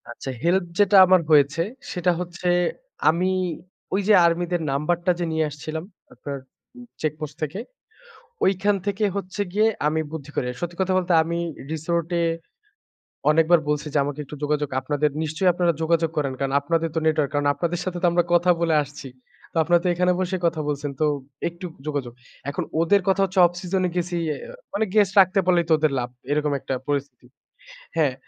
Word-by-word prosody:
আচ্ছা 120 +3 -7
হেল্প 175 +2 +2
যেটা 205 -1 +5
আমার 185 -1 +5
হয়েছে, 145 +2 +4 0.3
সেটা 180 0 +1
হচ্ছে 175 0 -5 0.6
আমি 175 +4 +2 0.6
ঐযে 200 +2 +3
আর্মিদের 175 +1 +1
নাম্বারটা 170 +5 +1
যে 175 - 0
নিয়ে 160 0 +1
আসছিলাম, 155 +2 -6 0.3
আপনার 140 -1 -6 0.4
উ - - -11 0.2
চেকপোস্ট 155 -1 -3
থেকে। 155 +6 -3 0.9
ঐখান 200 +2 +2
থেকে 205 +1 0
হচ্ছে 195 +1 -5
গিয়ে 215 +3 +3 0.2
আমি 155 +1 +1
বুদ্ধি 150 -3 -7
করে। 125 - 0
সত্যি 175 0 -4
কথা 190 0 +1
বলতে 180 -1 0
আমি 170 +1 -2 0.3
রিসোর্টে 170 +2 -1 1.1
অনেকবার 165 +2 +4
বলছি 150 0 -1
যে - - +4
আমাকে 145 +1 -4
একটু 150 - -9
যোগাযোগ 150 0 0
আপনাদের 145 +2 0
নিশ্চয়ই 160 +4 +1
আপনারা 175 0 +2
যোগাযোগ 165 0 +2
করেন, 140 -3 0
কারণ 135 -1 -2
আপনাদের 165 +3 0
তো - - +1
নেটওয়ার্ক 155 -3 +2
কারণ 145 0 +1
আপনাদের 170 +2 -2
সাথে 180 -1 -3
তো - - +4
আমরা 175 0 +3
কথা 175 +1 +4
বলে 165 -2 +2
আসছি। 145 -1 -9 0.4
তো - - -17
আপনারা 175 +2 +3
তো - - +2
এখানে 180 +1 +2
বসে 185 0 -1
কথা 165 -1 0
বলছেন। 145 0 -2
তো - - +3 0.4
একটু 170 +2 -8 0.2
যোগাযোগ। 140 -5 -3 0.4
এখন - - -3 0.2
ওদের 200 +5 +4
কথা 195 0 +3
হচ্ছে 190 0 -3
অফ - - -2
সিজনে 185 0 0
গেছি, 175 0 -1 0.2
আ - - -7 0.4
মানে 215 - +1
গেস্ট 205 -3 +4
রাখতে 190 +1 +4
পারলেই 175 -2 +3
তো - - +3
ওদের 155 -2 +2
লাভ 120 -1 -2 0.2
এরকম 150 0 +1
একটা 135 - -3
পরিস্থিতি। 140 -3 -3 0.7
হ্যাঁ 150 -5 +2
165 Hz, 175 wpm, -23 LUFS, 150-180 Hz, 1.1 s, যেটা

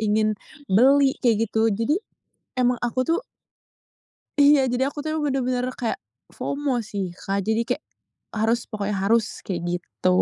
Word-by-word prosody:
ingin 215 0 +2 0.3
beli 270 +6 +5
kayak 225 -2 +3
gitu, 225 0 +2
jadi 230 +10 +1 0.6
emang 250 0 +3
aku 255 +2 0
tuh 330 - +2 1.2
Iya 285 -2 +6
jadi 250 +1 0
aku 295 - -6
tuh 305 - -4
emang 305 - -1
bener-bener 250 -1 0 0.2
kayak, 235 -2 -1 0.4
FOMO 280 -4 -1
sih, 195 -4 -4
Kak. 195 +1 -2
Jadi 220 +1 +2
kayak, - - -5 0.5
harus 225 +2 +2
pokoknya 205 -1 -2
harus, 225 +1 +1
kayak 180 -3 -2 0.2
gitu. 180 - -3
230 Hz, 145 wpm, -24 LUFS, 215-265 Hz, 1.2 s, Iya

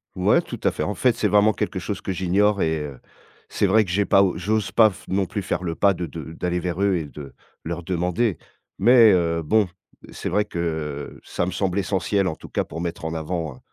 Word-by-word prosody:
Ouais, - - +3
tout - - -8
à - - +3
fait, - - -5
en - - -1
fait, - - +3
c'est - - +1
vraiment 105 +1 +4
quelque - - -3
chose - - -4
que - - -3
j'ignore 95 +3 +2
et 80 -1 0
heu, 65 -4 -9 0.5
c'est 100 - 0
vrai 110 +2 +4
que 90 - -5
j'ai 100 +3 +1
pas 95 0 +5
j'ose 105 +3 -1
pas 110 -2 +6
f 95 - -13
non 95 0 0
plus 100 - -4
faire 90 0 -2
le 85 -2 -3
pas 100 +2 +3
de 90 -2 -4
de 80 +3 -8
d'aller 90 +1 -2
vers 90 +1 -3
eux 100 -2 +3
et 80 - -2
de 70 -1 -10 0.3
leur 85 +1 -4
demander 90 +3 0 0.4
mais 115 +1 +7
heu, 85 -2 +1
bon, 105 +4 +2 0.4
c'est - - -5
vrai 105 0 +1
que 80 -6 -4
ça 85 - -2
me 95 - -3
semble 95 -1 -1
essentiel, 95 0 0
en 80 - -2
tout - - -13
cas, - - -1
pour 85 - -7
mettre 85 -1 -4
en 80 - -3
avant 80 -3 -4
90 Hz, 230 wpm, -23 LUFS, 85-100 Hz, 0.5 s, mais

